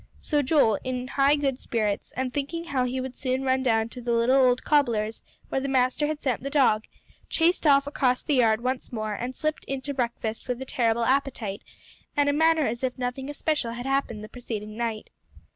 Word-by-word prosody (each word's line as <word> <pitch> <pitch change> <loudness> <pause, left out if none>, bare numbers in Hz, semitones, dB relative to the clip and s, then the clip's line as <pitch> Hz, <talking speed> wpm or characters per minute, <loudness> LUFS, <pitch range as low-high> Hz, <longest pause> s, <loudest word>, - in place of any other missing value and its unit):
So 295 -2 +1
Joel, 265 -6 +3
in 255 0 -3
high 280 +1 +4
good 275 -3 -1
spirits, 215 -3 -2
and 255 -1 -2
thinking 300 +4 -3
how 275 -6 0
he 255 +1 -2
would 260 -1 -5
soon 260 0 -1
run 260 0 +2
down 225 -3 +2
to 250 - -9
the 240 0 -2
little 235 +3 +3
old 255 -2 +4
cobbler's 230 -7 +1 0.3
where 270 - -1
the 275 - -2
master 260 +2 +2
had 305 -1 -3
sent 255 -6 -1
the 275 - -4
dog, 255 -7 +3 0.4
chased 335 0 +2
off 280 -1 +5
across 255 -3 +1
the 300 - 0
yard 230 -4 +3
once 255 0 -2
more, 215 -3 -3
and 245 +5 -4
slipped 310 0 -2
in 270 0 -3
to 285 +1 -4
breakfast 235 -3 -3
with 250 -1 -2
a 265 - -5
terrible 235 -2 +1
appetite, 255 -6 0 0.6
and 285 0 +4
a - - +2
manner 320 0 +3
as 240 +2 -3
if 255 0 -1
nothing 255 +2 -3
especial 290 -5 -1
had 245 +1 -6
happened 270 -6 -1
the - - -7
preceding 215 -4 -6
night. 225 -2 -3
255 Hz, 210 wpm, -26 LUFS, 235-280 Hz, 0.6 s, off